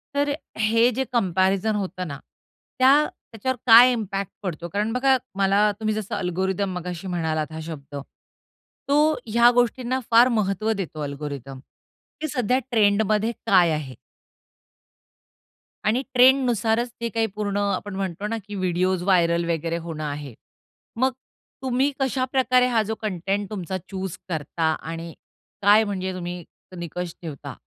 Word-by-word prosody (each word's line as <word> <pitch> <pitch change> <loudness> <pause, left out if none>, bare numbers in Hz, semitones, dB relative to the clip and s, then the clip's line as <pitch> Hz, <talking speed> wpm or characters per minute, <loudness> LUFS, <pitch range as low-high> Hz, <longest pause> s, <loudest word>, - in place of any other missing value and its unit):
तर 285 0 +1 0.3
हे 225 +2 +4
जे 265 - +1
कंपॅरिझन 195 0 +1
होतं 185 -2 -3
ना, 140 -2 -6 0.6
त्या 260 +1 +7 0.4
त्याच्यावर 250 +3 -2
काय 240 +2 +9
इम्पॅक्ट 200 -5 -3
पडतो? 170 -2 -4
कारण 210 +5 -1
बघा 265 +1 +3 0.2
मला 200 +2 +3
तुम्ही 215 -1 0
जसं 215 0 -4
अल्गोरिथम 190 +1 -1
मगाशी 180 +1 -6
म्हणालात, 160 -3 -2
हा 160 - -6
शब्द. 145 -3 -8 0.9
तो 300 +2 +4
ह्या 235 +2 +5
गोष्टींना 245 +1 +1
फार 235 +2 +7
महत्व 210 +2 0
देतो 180 -7 -5
अल्गोरिथम 140 -2 -6 0.6
की 310 - -1
सध्या 255 -3 +1
ट्रेंडमध्ये 215 0 +2
काय 180 -4 +5
आहे. 150 -4 -4 1.9
आणि 225 +4 +2
ट्रेंडनुसारच 245 -3 +4
ते 235 - -1
काही 225 +1 0
पूर्ण 205 -1 -2
अ, 200 -1 +1
आपण 205 -2 -6
म्हणतो 195 +1 -3
ना, 230 +1 -2
की 205 - -6
व्हिडिओज 185 -1 0
व्हायरल 170 -3 +3
वगैरे 165 0 -1
होणं 155 -2 -5
आहे. 145 -3 -5 0.6
मग 260 +3 +2 0.5
तुम्ही 265 +2 +1
कशाप्रकारे 255 -1 +2
हा 235 -3 +2
जो 220 +1 -3
कंटेंट 195 0 -2
तुमचा 190 -3 -4
चुज 190 -2 -5
करता 160 0 -1 0.2
आणि 165 0 -6 0.5
काय 205 +2 +6
म्हणजे 190 -3 -3
तुम्ही 175 -1 -5 0.3
निकष 175 0 -5
ठेवता? 145 -4 -7
200 Hz, 135 wpm, -24 LUFS, 175-230 Hz, 1.9 s, काय